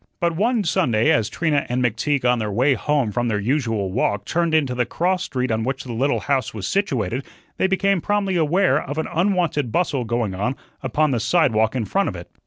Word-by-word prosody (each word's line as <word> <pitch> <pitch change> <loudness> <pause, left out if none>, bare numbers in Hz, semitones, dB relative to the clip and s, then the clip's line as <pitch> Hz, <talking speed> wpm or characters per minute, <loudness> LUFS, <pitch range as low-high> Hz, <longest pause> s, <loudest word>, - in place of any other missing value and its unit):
But 170 -1 0
one 225 +4 +1
Sunday 115 - +2
as 110 -3 +2
Trina 150 -4 0
and 125 +1 0
McTeague 125 +4 0
on 125 -1 +3
their 105 -1 -2
way 130 +7 +3
home 140 -4 0
from 120 +3 -1
their 110 -3 0
usual 115 -4 -1
walk 100 +1 0
turned 170 -1 0
into 140 -5 +2
the 125 0 +1
cross 180 +8 -1
street 125 -3 -2
on 110 0 0
which 130 +2 -3
the 125 - -6
little 135 +5 0
house 135 -6 -1
was 95 -3 -4
situated, 135 - -1 0.3
they - - +2
became 195 -1 +1
promptly 200 -1 0
aware 175 +4 +2
of 145 +3 -6
an 160 - -1
unwonted 170 - +1
bustle 145 -4 0
going 115 -3 -1
on 105 +8 -2 0.3
upon 145 +3 +1
the 120 - 0
sidewalk 115 -4 +2
in 120 -4 -1
front 195 - 0
of - - -6
it. 85 0 -10
130 Hz, 210 wpm, -22 LUFS, 115-170 Hz, 0.3 s, on